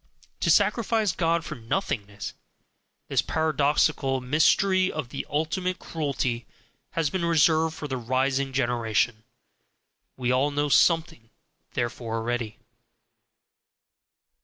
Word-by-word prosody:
To - - 0
sacrifice 225 -3 +3
God 165 0 0
for - - -5
nothingness 110 - -3 0.7
this - - +2
paradoxical 150 -3 +1
mystery 185 +8 +3
of 120 - -4
the 140 - -5
ultimate 180 +5 -1
cruelty 135 -8 -3 0.5
has 160 -3 0
been 185 -2 -2
reserved 160 -1 +3
for 150 - -6
the 130 -2 -3
rising 130 +3 0
generation; 120 -3 0 0.9
we 125 -1 0
all 130 +3 +2
know 145 0 -1
something 160 -4 +2 0.5
thereof 120 0 -2
already. 115 0 -3
140 Hz, 105 wpm, -26 LUFS, 120-160 Hz, 0.9 s, sacrifice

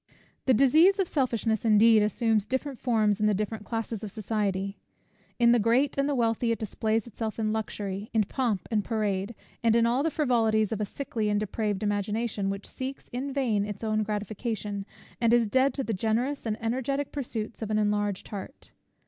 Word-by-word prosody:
The 260 - +6
disease 315 - +5
of 385 -3 +1
selfishness, 230 -7 0
indeed, 220 0 +6
assumes 215 +1 +2
different 260 +3 -3
forms 215 -4 +2
in 215 - +3
the 210 - +3
different 215 +1 -3
classes 225 -2 -4
of 210 - -4
society. 200 -2 -2 0.6
In 235 -1 +5
the 240 - +5
great 235 +6 +2
and 275 +1 +1
the 285 - +1
wealthy, 230 -1 +1
it 230 - 0
displays 220 +1 -1
itself 225 -1 -5
in 215 -1 0
luxury, 205 -2 -4
in 220 -2 +3
pomp 220 -2 -1
and 210 -2 +1
parade; 210 -1 -1 0.3
and 230 -1 +4
in 230 0 +4
all 240 +3 +2
the 325 - +1
frivolities 225 -8 +2
of 215 -1 -2
a - - +1
sickly 220 -1 -3
and 205 0 +2
depraved 210 0 -2
imagination, 205 0 -1
which 195 +1 -4
seeks 265 +1 -6
in 265 +3 -4
vain 245 -7 +1
its 205 +1 -6
own 215 -1 +1
gratification, 210 -1 -3 0.3
and 230 0 +4
is 235 -2 +4
dead 260 +5 +3
to 270 - -2
the 225 - -2
generous 230 +7 -1
and 215 0 -2
energetic 260 +4 -1
pursuits 235 -6 -4
of 220 - -3
an 215 - +1
enlarged 205 -2 0
heart. 205 +7 -8
220 Hz, 190 wpm, -28 LUFS, 210-240 Hz, 0.6 s, The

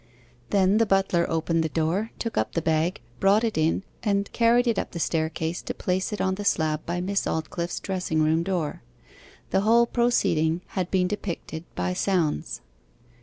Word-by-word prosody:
Then 195 +1 +3
the 225 - +3
butler 195 -3 +2
opened 165 0 +1
the 160 - -1
door, 170 +8 0
took 230 -2 -4
up 110 - 0
the 165 - 0
bag, 160 +3 +1 0.2
brought 200 +3 +4
it 225 -2 0
in, 160 +4 +1 0.2
and 200 -2 0
carried 240 +1 +4
it 230 -4 +1
up - - -5
the 170 - -4
staircase 160 +1 -1
to - - -5
place 185 +2 -1
it 210 - -4
on 190 - +1
the 205 +2 -4
slab 155 -5 +1
by 175 +1 -1
Miss 195 +2 -1
Aldclyffe's 170 +2 -3
dressing 180 -5 -1
room 160 +1 +2
door. 170 - -2 0.7
The 190 - +3
whole 230 +3 +5
proceeding 175 -10 +1
had 185 -2 -2
been 185 -1 +2
depicted 175 -4 -5
by 90 0 -1
sounds. 150 - 0
180 Hz, 175 wpm, -25 LUFS, 160-200 Hz, 0.7 s, whole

